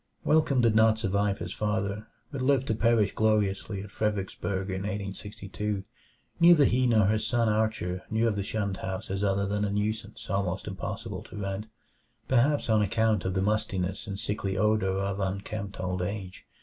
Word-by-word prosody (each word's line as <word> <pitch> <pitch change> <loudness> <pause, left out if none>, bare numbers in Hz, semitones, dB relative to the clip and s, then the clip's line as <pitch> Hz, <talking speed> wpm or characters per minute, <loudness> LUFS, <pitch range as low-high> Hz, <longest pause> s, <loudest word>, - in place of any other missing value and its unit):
Welcome 150 -4 +3
did 115 -2 +3
not 110 0 +5
survive 100 -2 0
his 85 +2 -5
father, 105 0 -2 0.2
but 140 -3 -4
lived 135 0 +3
to - - +3
perish 110 -2 +2
gloriously 105 -2 +1
at 100 - -11
Fredericksburg 100 -2 -2
in 95 - -2
1862. 105 0 -4 0.6
Neither 170 -4 +7
he 125 +1 +3
nor 110 -4 +4
his 110 +2 +1
son 120 -2 +2
Archer 105 -4 0
knew 110 +1 +2
of 110 - +1
the 100 - -1
shunned 100 -1 -2
house 95 +2 -5
as 95 +1 -1
other 100 0 +1
than 105 +1 -1
a 105 - 0
nuisance 105 +1 -3
almost 95 -1 -1
impossible 100 +1 -5
to - - -10
rent 100 +1 -3 0.6
perhaps 130 +4 +3
on 110 -2 +4
account 105 0 +1
of 95 0 -1
the 95 - +1
mustiness 105 -1 -1
and 100 -1 -4
sickly 100 -1 -2
odor 105 -2 +2
of 100 0 -2
unkempt 100 +1 -4
old 90 0 -2
age. 95 0 -5
105 Hz, 175 wpm, -28 LUFS, 95-110 Hz, 0.6 s, Neither